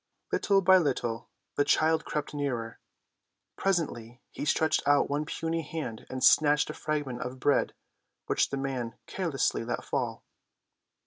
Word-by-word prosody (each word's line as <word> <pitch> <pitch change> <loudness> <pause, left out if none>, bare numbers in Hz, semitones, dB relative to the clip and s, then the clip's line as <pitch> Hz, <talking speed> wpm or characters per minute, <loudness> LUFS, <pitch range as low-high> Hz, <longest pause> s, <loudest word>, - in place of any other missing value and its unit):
Little 195 -1 +3
by 185 +1 +7
little 120 -7 -2 0.3
the 145 - +4
child 160 +2 +2
crept 150 0 -3
nearer. 125 -6 -3 0.8
Presently 130 -11 -1
he - - -5
stretched 160 +1 +2
out 145 0 +4
one 145 +2 0
puny 165 0 -2
hand 145 -7 -6
and 130 0 -4
snatched 150 0 +5
a - - -8
fragment 145 -6 -3
of 125 +1 -5
bread 145 +2 +2 0.5
which - - +1
the 140 - -3
man 130 -4 -3
carelessly 160 -11 -1
let 120 - -3
fall. - - -2
145 Hz, 140 wpm, -29 LUFS, 125-160 Hz, 0.8 s, by